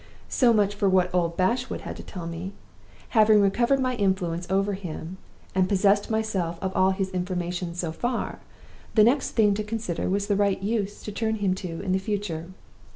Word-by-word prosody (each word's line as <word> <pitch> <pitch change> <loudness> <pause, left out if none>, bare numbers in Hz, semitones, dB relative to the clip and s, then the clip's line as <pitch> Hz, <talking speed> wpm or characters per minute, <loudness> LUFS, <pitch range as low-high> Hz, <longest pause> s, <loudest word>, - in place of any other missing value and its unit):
"So 245 -3 +4
much 205 -2 +3
for 205 -1 +1
what 185 -1 +2
old 170 -2 0
Bashwood 240 +8 0
had - - -6
to - - -7
tell 180 -4 -8
me. 170 +4 -5 0.6
Having 215 -2 +5
recovered 235 +7 +3
my 255 -1 +1
influence 180 -4 0
over 195 +1 +1
him, 180 -1 -6 0.4
and 185 0 +2
possessed 200 0 +3
myself 205 -7 -1
of 190 0 -3
all 185 0 +4
his 190 0 -1
information 180 -1 -3
so 175 -2 -2
far, 240 +9 -3 0.6
the 215 - +7
next 260 +5 +2
thing 210 -3 +4
to 215 +2 -2
consider 210 -6 -3
was 200 +2 0
the 205 -1 +1
right 200 -1 +2
use 205 0 -2
to 210 - -5
turn 220 +1 -1
him 200 -3 +1
to 180 -3 -5
in 185 - -2
the 190 - +2
future. 190 -5 -3
195 Hz, 190 wpm, -26 LUFS, 180-215 Hz, 0.6 s, the